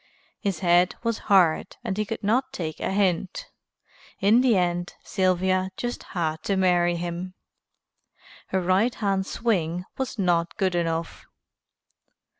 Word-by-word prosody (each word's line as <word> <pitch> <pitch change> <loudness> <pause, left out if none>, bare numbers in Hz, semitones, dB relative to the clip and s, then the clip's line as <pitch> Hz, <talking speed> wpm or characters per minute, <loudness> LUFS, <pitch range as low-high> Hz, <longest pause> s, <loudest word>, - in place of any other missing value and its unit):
His 195 -5 -2
head 175 0 +4
was 230 -2 -1
hard 180 -5 +3
and 190 - -2
he 215 +1 -1
could 225 +1 -5
not 245 +6 +1
take 155 -3 -5
a - - -2
hint. 200 - -1 0.7
In 215 +5 +5
the 245 -5 +4
end 175 -1 -1
Sylvia 185 0 +1
just 240 0 -3 0.2
had 160 -2 -1
to 195 - +1
marry 175 -2 +3
him. 175 +2 -5 1.1
Her 190 - 0
right 190 +7 +2
hand 195 -2 0
swing 180 -6 -1
was 265 -2 -3
not 175 -3 +1
good 190 -2 +1
enough. 165 -1 -2
185 Hz, 135 wpm, -25 LUFS, 175-205 Hz, 1.1 s, In